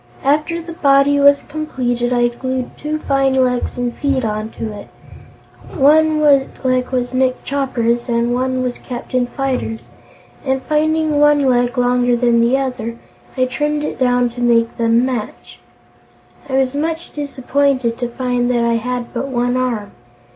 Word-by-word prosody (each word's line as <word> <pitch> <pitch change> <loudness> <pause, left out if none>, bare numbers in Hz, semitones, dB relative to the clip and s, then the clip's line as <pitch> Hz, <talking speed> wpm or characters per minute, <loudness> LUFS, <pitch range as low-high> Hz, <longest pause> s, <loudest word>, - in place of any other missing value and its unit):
After 305 +4 0
the 335 0 -8
body 285 -2 +3
was 280 0 +5
completed, 250 -5 -2
I 240 -1 +2
glued 255 +1 -4
two 300 +1 -3
fine 275 -3 +1
legs 250 -2 0
and 245 -1 -2
feet 275 -3 0
onto 215 +1 -4
it. 205 - -10 0.9
One 310 +1 +4
leg 265 -3 +2
was 250 -1 -2
Nick 255 0 0
Chopper's 245 -3 -1
and 235 0 +1
one 255 +1 -1
was 250 -1 -3
Captain 250 0 -3
Fyter's 255 -4 -3 0.5
and, 265 -1 -1
finding 310 0 +1
one 295 -1 +4
leg 245 -1 +1
longer 245 0 +2
than 235 -1 +2
the 240 +3 +3
other, 250 -4 -3 0.4
I 255 - +3
trimmed 295 +3 -2
it 300 - -4
down 245 -1 +2
to 245 +1 -8
make 235 -1 +2
them 230 +1 +2
match. 210 - -5 0.9
I - - -5
was 265 -1 +1
much 320 +3 -3
disappointed 275 -3 -1
to 245 -1 -2
find 245 0 -1
that 240 -1 +1
I 235 0 +2
had 245 +1 -4
but 250 +2 -3
one 245 -1 0
arm. 240 -5 -2
255 Hz, 155 wpm, -17 LUFS, 240-280 Hz, 0.9 s, was